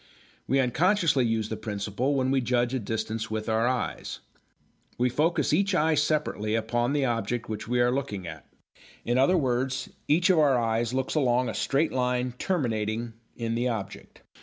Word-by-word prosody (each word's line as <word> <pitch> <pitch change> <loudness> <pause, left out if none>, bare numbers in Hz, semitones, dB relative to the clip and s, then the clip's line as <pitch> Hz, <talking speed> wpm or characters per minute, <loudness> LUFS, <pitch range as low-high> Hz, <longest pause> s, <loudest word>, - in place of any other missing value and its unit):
We 135 - +2
unconsciously 145 - +2
use 110 -1 -1
the 110 - -3
principle 105 +6 -2
when 130 -1 +1
we 135 -1 +2
judge 120 0 +1
a 130 - 0
distance 110 0 -3
with 110 0 -3
our 110 +1 +2
eyes. 125 -1 -3 0.8
We 125 +1 +2
focus 155 +3 +1
each 195 +3 +2
eye 160 -1 +3
separately 150 -8 0
upon 120 +3 0
the 145 -2 +1
object 115 -1 -2
which 110 0 -5
we 125 +1 0
are 120 0 +3
looking 105 -9 -3
at. 80 -3 -9 0.6
In 120 +2 +1
other 160 +8 +4
words, 130 -2 -1 0.2
each 175 +5 +4
of 175 - +3
our 140 -4 +4
eyes 115 0 0
looks 130 0 -1
along 125 -4 +2
a - - -3
straight 145 +4 +1
line 125 0 0
terminating 115 - -1 0.2
in 115 -1 -3
the 120 +2 0
object. 105 -5 -6
125 Hz, 175 wpm, -27 LUFS, 115-140 Hz, 0.8 s, other